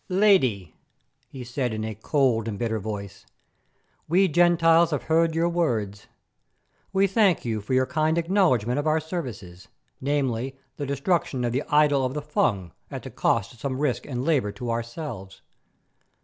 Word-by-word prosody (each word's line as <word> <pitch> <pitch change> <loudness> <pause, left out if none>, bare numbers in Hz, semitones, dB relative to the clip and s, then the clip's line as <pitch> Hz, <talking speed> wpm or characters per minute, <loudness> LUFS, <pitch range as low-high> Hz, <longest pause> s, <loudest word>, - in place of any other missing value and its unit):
"Lady," 180 - +3 0.5
he 130 -2 -9
said, 125 0 -2
in 110 - -3
a 110 0 -4
cold 115 0 +1
and 105 -3 -4
bitter 110 -1 -1
voice, 100 -1 -6 0.8
"we 185 +4 +4
'Gentiles' 170 0 +4
have 150 -4 -2
heard 160 0 +2
your 165 +1 +2
words. 115 - -1 0.8
We 195 0 +3
thank 195 - +2
you 110 -2 -2
for 120 +6 -2
your 130 0 +3
kind 155 +2 0
acknowledgment 165 - +2
of 145 - -2
our 155 +1 +3
services, 120 - -7 0.3
namely, 135 -2 -1 0.2
the 145 - -4
destruction 140 -1 0
of 120 - 0
the 130 +4 0
idol 150 -2 +4
of 130 +2 -2
the 150 - -2
Fung 100 - 0 0.2
at - - -7
the - - -8
cost 115 +1 0
of 120 - -19
some 130 +1 -3
risk 140 -3 -1
and 125 -2 -3
labour 135 -11 +1
to 120 -2 -4
ourselves. 115 - -6
135 Hz, 165 wpm, -25 LUFS, 115-165 Hz, 0.8 s, we